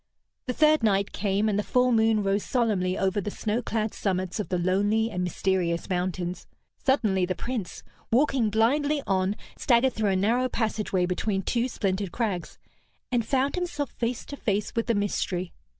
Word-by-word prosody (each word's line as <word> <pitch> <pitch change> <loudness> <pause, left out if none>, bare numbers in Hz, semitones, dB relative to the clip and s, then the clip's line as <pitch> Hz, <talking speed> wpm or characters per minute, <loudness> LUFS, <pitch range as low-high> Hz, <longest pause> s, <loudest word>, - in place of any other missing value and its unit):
The 250 - 0
third 305 +1 +4
night 200 -3 +2
came, 200 +2 0
and 205 -1 +1
the - - 0
full 250 +2 +2
moon 220 -2 +3
rose 200 +1 +1
solemnly 205 -7 0
over 195 +1 +1
the 205 - -3
snow 215 +3 -2
clad 220 -2 -2
summits 185 -1 -2
of 210 - -3
the 180 - 0
lonely 205 +5 +1
and 180 -2 -2
mysterious 180 -1 0
mountains. 180 0 -2 0.4
Suddenly 210 -10 +2
the 185 - -1
Prince, 235 -6 -5 0.3
walking 260 -2 +2
blindly 280 +7 +2
on, 190 +1 +1 0.2
staggered 250 +1 +3
through 215 -2 0
a 190 - +2
narrow 235 +7 +2
passage 220 -3 -2
way 185 -2 +2
between 190 +2 -1
two 240 +5 0
splintered 195 -5 -2
crags, 200 -6 -3 0.5
and 240 -2 +2
found 265 +4 +1
himself 325 -6 -3
face 235 0 -3
to 285 - -7
face 210 -5 -1
with 230 - 0
the 230 - +2
mystery. 185 -3 -1
210 Hz, 175 wpm, -26 LUFS, 190-240 Hz, 0.5 s, third